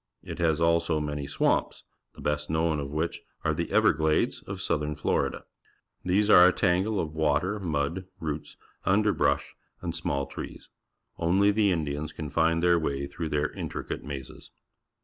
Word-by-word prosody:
It - - -7
has 80 -2 +2
also 85 -1 +2
many 75 -1 -3
swamps, - - 0 0.3
the - - -11
best 75 0 -1
known 80 -1 +1
of 70 -1 -4
which 80 +3 -2 0.2
are - - +2
the - - -3
Everglades 80 0 +2
of 95 -1 -5
Southern 75 -4 -1
Florida. 75 - -1 0.6
These 95 +4 +2
are 90 -4 +9
a - - +5
tangle 95 +4 +1
of 80 -2 -3
water, 80 +6 +1
mud, 80 0 -2
roots, 75 -2 -5 0.3
underl^rush^ 105 +2 +2 0.3
and - - -4
small 70 0 -1
trees. - - -9 0.5
Only 95 +5 +3
the 105 -1 +3
Indians 75 -2 -2
can 75 -3 -6
find 80 +2 +2
their 85 -1 +5
way 70 -3 -2
through 80 +3 -5
their 75 0 0
intricate - - -5
mazes. 70 -2 -8
80 Hz, 155 wpm, -27 LUFS, 75-90 Hz, 0.6 s, are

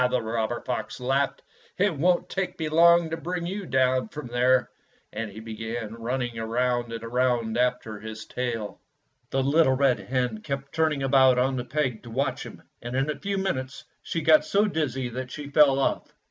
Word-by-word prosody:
the 125 - +1
robber 115 +1 -2
fox 125 0 -4
laughed, 135 +2 0 0.3
"it 195 -3 +2
won't 175 +5 +2
take 190 -1 -3
me 160 - -2
long 170 +1 +5
to - - 0
bring 175 +2 -4
you 195 +1 -4
down 130 0 +2
from 150 -2 -8
there." 125 +1 +2 0.5
And 110 0 -4
he 105 - -9
began 110 0 -5
running 120 +1 -3
round 120 +1 0
and 115 -1 -6
round 120 -1 0
after 125 -3 0
his 110 0 -8
tail. 115 -4 -4 0.5
The 135 0 0
little 140 0 +4
red 135 -2 +3
hen 125 -4 -2
kept 140 +1 -5
turning 155 -4 +1
about 130 -1 +5
on 130 +2 +2
the 125 -1 -3
peg 130 -4 -1
to 120 - -11
watch 135 +5 -1
him, - - -13 0.2
and 120 +1 -5
in 135 +3 +1
a 145 - -7
few 200 0 -2
minutes 135 -9 -3 0.2
she 165 - -3
got 155 0 +6
so 205 +2 +2
dizzy 140 - -1
that 125 +2 -5
she 145 +1 -7
fell 140 -2 +5
off. 135 - -1
130 Hz, 190 wpm, -26 LUFS, 120-150 Hz, 0.5 s, got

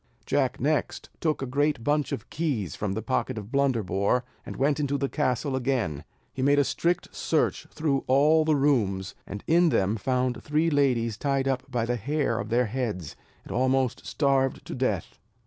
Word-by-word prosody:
Jack 135 -2 0
next 150 +4 -1
took 155 -4 0
a - - -1
great 140 -1 0
bunch 145 +2 +1
of - - -4
keys 125 - -2
from 100 -2 -2
the 110 +1 -3
pocket 130 -2 -1
of 105 +1 -7
Blunderbore, 125 -4 +1 0.2
and - - -7
went 145 +3 +1
into 140 -1 0
the 140 0 0
castle 130 +2 -1
again. 120 - -1 0.3
He 130 - -4
made 140 +2 +4
a 145 - +5
strict 170 +5 -1
search - - 0
through 145 -4 -1
all 150 +4 +5
the 155 -1 +2
rooms; 110 -10 +1
and 100 +1 -7
in 170 +1 +4
them 100 -4 +1
found 125 +2 -1
three 155 +3 +1
ladies 125 -7 +2
tied 135 +1 0
up 135 0 -1
by 120 -3 -1
the 120 +1 -1
hair 140 0 -1
of 105 - -4
their 120 +2 +2
heads, 105 - -3 0.3
and - - -11
almost 130 -6 +1
starved 135 - +1
to - - -6
death. - - -2
130 Hz, 180 wpm, -27 LUFS, 115-145 Hz, 0.3 s, a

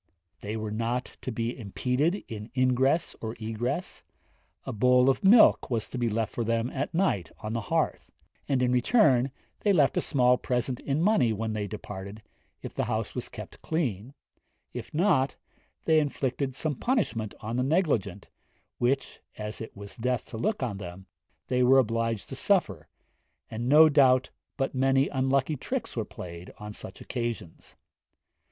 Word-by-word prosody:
They 105 +2 -4
were 110 -1 -4
not 115 +3 -2
to 130 - -4
be 115 +1 -2
impeded 130 - -1
in 105 0 -7
ingress 130 +5 +2
or 110 +1 -4
egress; 120 - -3 0.6
a - - -4
bowl 125 +4 +5
of 135 - -4
milk 215 +4 +6
was 115 -4 -1
to 125 - -5
be 120 -1 +1
left 110 +1 -1
for 120 - -1
them 115 +2 0
at 140 +1 -3
night 165 - +1
on 110 +1 -4
the 115 - -1
hearth; 105 - -1 0.4
and, 130 -2 +2
in 125 - +2
return, 130 - +4 0.3
they 205 - +2
left 150 -8 +4
a - - +3
small 125 -3 +3
present 125 0 -1
in 145 +3 -1
money 170 - +3
when 110 +1 -2
they 105 -1 -2
departed, 105 0 -8 0.4
if - - -6
the - - -1
house - - -2
was - - -4
kept - - -10
clean; 130 - -2 0.6
if - - -7
not, 155 -6 +2 0.5
they 160 -1 +5
inflicted 135 -2 -2
some 155 +2 -1
punishment 130 - -1
on 110 +2 -4
the - - +2
negligent, 130 - 0 0.5
which, 135 +3 0 0.2
as 105 +1 -5
it 110 - -8
was 100 0 -8
death 125 0 -1
to 115 - -8
look 195 - -1
on 110 -6 -2
them, 95 -1 -8 0.4
they 125 0 0
were 130 +2 +6
obliged 115 -3 +1
to - - -6
suffer, - - +1 0.6
and 115 +2 -3
no 155 +3 +8
doubt 130 -4 +4 0.3
but 135 -1 -1
many 135 +1 +3
unlucky 135 +2 +1
tricks 230 - -4
were 115 - -1
played 85 -2 -9
on 105 0 -8
such 95 - -9
occasions. 115 -9 -5
125 Hz, 165 wpm, -28 LUFS, 110-140 Hz, 0.6 s, no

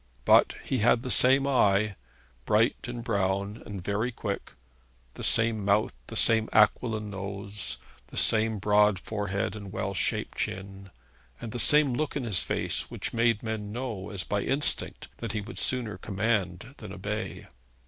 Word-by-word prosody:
But - - +5
he 130 - -2
had 115 +2 +3
the 130 - -1
same 135 +3 +6
eye, 105 -6 +2 0.5
bright 110 +2 +3
and 120 -1 -6
brown 100 -1 -2
and 100 -4 -7
very 105 +6 -1
quick, 105 -4 -5 0.6
the - - -9
same 110 -2 +3
mouth, 100 +2 +1
the - - -8
same 110 -1 +4
aquiline 105 0 +2
nose, 100 +1 -3 0.3
the - - -9
same 110 0 +4
broad 105 0 +3
forehead 100 +1 -3
and 100 -3 -9
well 95 +1 -3
shaped 95 - -2
chin, 95 0 -5 0.5
and 115 - -7
the 120 - -3
same 150 0 +6
look 150 +4 -2
in 140 - -2
his 105 -7 +3
face - - 0
which - - -4
made 115 -2 +1
men 110 -2 -4
know 115 -5 -5
as 100 -3 -5
by 100 -1 -2
instinct 140 +6 0
that 115 -3 -5
he 105 - -2
would 110 +4 -9
sooner 115 -7 -2
command 100 +2 -2
than 105 -3 -10
obey. 105 +3 -5
105 Hz, 160 wpm, -27 LUFS, 100-115 Hz, 0.6 s, same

